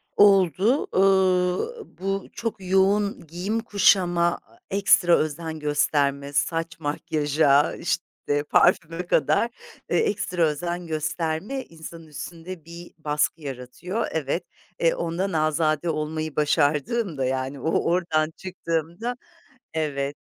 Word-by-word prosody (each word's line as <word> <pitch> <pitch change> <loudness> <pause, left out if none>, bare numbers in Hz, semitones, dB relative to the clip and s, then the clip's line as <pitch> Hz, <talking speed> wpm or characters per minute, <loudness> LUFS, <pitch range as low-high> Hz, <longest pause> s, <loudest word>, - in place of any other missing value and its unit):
Oldu, 200 - +4
ııı, 190 - +2 0.2
bu 195 +1 -2
çok 230 -1 -3
yoğun 195 0 +1
giyim 185 +8 -2
kuşama, 190 -5 +3
aaa, - - -19
ekstra 190 -3 +4
özen 160 +1 -3
gösterme, 145 -1 0
saç 165 +2 -1
makyaja, 145 -1 +2
işte, 145 0 -2
parfüme 165 +2 +2
kadar 155 - +2 0.4
e - - +2
ekstra 185 - 0
özen 170 +3 -1
gösterme 160 - -2
insanın 165 0 -11
üstünde 165 +2 -8
bir 170 +1 -10
baskı 150 +1 -1
yaratıyor. 140 - -4
Evet, 160 +2 -1 0.4
e, 165 - +3
ondan 175 +4 -2
azade 155 +1 +1
olmayı 155 0 -3
başardığımda, 150 - +1
yani, 130 +1 -2
o 160 - 0
oradan 160 -3 +1
çıktığımda 175 +5 -3 0.6
evet, 145 -3 -2
165 Hz, 105 wpm, -24 LUFS, 150-185 Hz, 0.6 s, Oldu